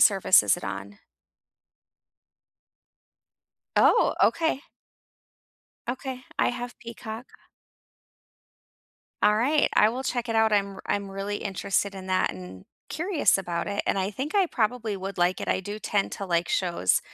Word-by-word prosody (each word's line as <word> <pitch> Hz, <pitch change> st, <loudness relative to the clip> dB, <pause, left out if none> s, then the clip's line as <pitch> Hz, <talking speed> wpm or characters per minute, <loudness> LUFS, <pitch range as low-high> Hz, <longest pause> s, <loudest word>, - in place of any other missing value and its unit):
service 195 Hz, -2 st, +6 dB
is -, -, +3 dB
it -, -, -8 dB
on? 100 Hz, +1 st, -6 dB, 2.8 s
Oh, -, -, +5 dB
okay. 320 Hz, +4 st, +2 dB, 1.3 s
Okay, 260 Hz, +1 st, -4 dB, 0.2 s
I -, -, +3 dB
have 245 Hz, 0 st, -6 dB
Peacock. 230 Hz, +1 st, -8 dB, 2.0 s
Alright, 240 Hz, +9 st, +3 dB
I 210 Hz, -, +6 dB
will 255 Hz, +4 st, -4 dB
check 245 Hz, -2 st, -2 dB
it 225 Hz, -, 0 dB
out. 220 Hz, -1 st, +4 dB
I'm 200 Hz, -1 st, +1 dB
r -, -, -10 dB
I'm 200 Hz, -1 st, -1 dB
really 195 Hz, +1 st, -3 dB
interested 195 Hz, 0 st, -1 dB
in 190 Hz, -1 st, -8 dB
that 185 Hz, 0 st, +1 dB
and 90 Hz, 0 st, -10 dB, 0.2 s
curious 345 Hz, -1 st, +2 dB
about 175 Hz, -3 st, -3 dB
it, 200 Hz, 0 st, -1 dB
and -, -, +1 dB
I 190 Hz, +1 st, 0 dB
think 265 Hz, +8 st, -4 dB
I 390 Hz, -2 st, +4 dB
probably 225 Hz, -5 st, -1 dB
would 195 Hz, 0 st, -6 dB
like 175 Hz, +1 st, +2 dB
it, -, -, -4 dB
I -, -, +2 dB
do 205 Hz, +3 st, -6 dB
tend 205 Hz, -2 st, 0 dB
to 200 Hz, -, -4 dB
like 170 Hz, -2 st, 0 dB
shows 170 Hz, -, +1 dB
205 Hz, 145 wpm, -26 LUFS, 190-245 Hz, 2.8 s, service